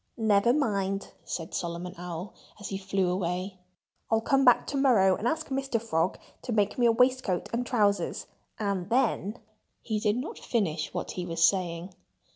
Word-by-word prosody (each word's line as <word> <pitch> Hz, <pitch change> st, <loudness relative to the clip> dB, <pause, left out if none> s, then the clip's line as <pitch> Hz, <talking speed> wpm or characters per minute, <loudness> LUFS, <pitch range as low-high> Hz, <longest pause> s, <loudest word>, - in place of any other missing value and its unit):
"Nevermind!" 205 Hz, -3 st, +1 dB
said 165 Hz, -2 st, -5 dB
Solomon 175 Hz, +1 st, -4 dB
Owl, 175 Hz, +2 st, -6 dB, 0.3 s
as 205 Hz, -, -6 dB
he 195 Hz, -, -3 dB
flew 190 Hz, -2 st, 0 dB
way. 185 Hz, +1 st, -3 dB, 0.5 s
"I'll 225 Hz, -, +3 dB
come 270 Hz, +4 st, +2 dB
back 245 Hz, -2 st, +5 dB
to 280 Hz, -, -3 dB
morrow 220 Hz, -9 st, +4 dB
and 230 Hz, -, -2 dB
ask 315 Hz, +4 st, -1 dB
Mr. 270 Hz, -3 st, -1 dB
Frog 180 Hz, -6 st, 0 dB, 0.2 s
to -, -, -5 dB
make 210 Hz, +1 st, +1 dB
me 240 Hz, -, +5 dB
a -, -, +6 dB
waistcoat 250 Hz, -6 st, +1 dB
and 240 Hz, +1 st, 0 dB
trousers. 205 Hz, -7 st, +1 dB, 0.3 s
And 200 Hz, -3 st, -2 dB
then——" 230 Hz, -3 st, +1 dB, 0.5 s
He 215 Hz, -2 st, -1 dB
did 210 Hz, +1 st, +1 dB
not 255 Hz, -, -5 dB
finish 160 Hz, -10 st, -1 dB
what -, -, -4 dB
he 180 Hz, -, -4 dB
was 165 Hz, -1 st, +3 dB
saying. 180 Hz, -1 st, -2 dB
200 Hz, 165 wpm, -28 LUFS, 180-235 Hz, 0.5 s, a